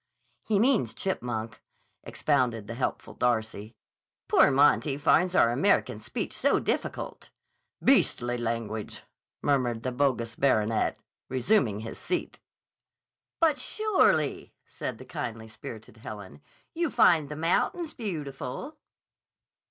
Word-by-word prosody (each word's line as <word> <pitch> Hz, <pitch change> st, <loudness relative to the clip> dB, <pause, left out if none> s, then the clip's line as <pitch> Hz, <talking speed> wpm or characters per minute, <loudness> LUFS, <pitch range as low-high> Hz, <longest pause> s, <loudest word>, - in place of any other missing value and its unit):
"He 215 Hz, -, 0 dB
means 220 Hz, -, +2 dB
chipmunk," 120 Hz, -, -3 dB, 0.4 s
expounded 125 Hz, -7 st, 0 dB
the 115 Hz, -, -6 dB
helpful 125 Hz, +2 st, -3 dB
Darcy. 110 Hz, -2 st, -1 dB, 0.5 s
"Poor -, -, +6 dB
Monty 140 Hz, +1 st, +3 dB
finds 175 Hz, +5 st, +3 dB
our 115 Hz, -, +5 dB
American 120 Hz, -, +2 dB
speech -, -, -4 dB
so -, -, +3 dB
difficult." -, -, -3 dB, 0.5 s
"Beastly 120 Hz, 0 st, +3 dB
language," 115 Hz, -2 st, -4 dB, 0.4 s
murmured 125 Hz, -5 st, +1 dB
the 130 Hz, -, -1 dB
bogus 125 Hz, -4 st, 0 dB
baronet, 110 Hz, -5 st, +1 dB, 0.3 s
resuming 125 Hz, -, +1 dB
his 115 Hz, -, -7 dB
seat. 360 Hz, -, -3 dB, 1.0 s
"But 315 Hz, -3 st, +3 dB
surely," 430 Hz, -2 st, +1 dB
said -, -, -5 dB
the -, -, -11 dB
kindly 120 Hz, -10 st, -5 dB
spirited 110 Hz, 0 st, -10 dB
Helen, 105 Hz, +2 st, -9 dB, 0.3 s
"you 335 Hz, -1 st, 0 dB
find 170 Hz, -, +4 dB
the 150 Hz, -, -5 dB
mountains 180 Hz, -, 0 dB
beautiful." 160 Hz, -, -5 dB
130 Hz, 110 wpm, -28 LUFS, 115-175 Hz, 1.0 s, Poor